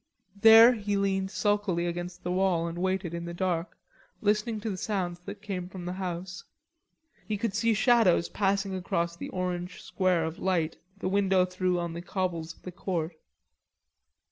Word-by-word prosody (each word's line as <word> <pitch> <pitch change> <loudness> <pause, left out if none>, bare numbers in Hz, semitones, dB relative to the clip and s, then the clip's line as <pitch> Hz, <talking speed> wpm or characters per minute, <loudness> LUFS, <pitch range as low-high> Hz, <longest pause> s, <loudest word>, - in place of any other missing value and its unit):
There 225 +2 +9
he 205 -3 -1
leaned 195 -1 0
sulkily 205 -4 0
against 175 +1 -5
the 180 - -2
wall 180 -2 +2
and 170 0 -4
waited 185 -2 -1
in 170 0 -4
the 170 0 -6
dark, 175 -1 -2 0.4
listening 215 +1 +1
to 225 - -3
the - - -3
sounds 180 -3 -2
that 200 0 -8
came 185 -4 -4
from 185 -2 -8
the 180 - -3
house. 185 0 -5 0.8
He 210 -1 -1
could 205 0 -2
see 225 +1 +2
shadows 225 -7 +4
passing 195 -1 0
across 170 -2 -1
the - - -7
orange 180 -1 -3
square 185 -4 +1
of 160 +2 -5
light 175 -4 0 0.2
the 190 - -3
window 190 -1 +3
threw 185 0 -1
on 170 -1 -3
the 170 - -5
cobbles 175 -3 -3
of - - -27
the 180 - -6
court. 175 -3 -3
185 Hz, 170 wpm, -28 LUFS, 175-200 Hz, 0.8 s, There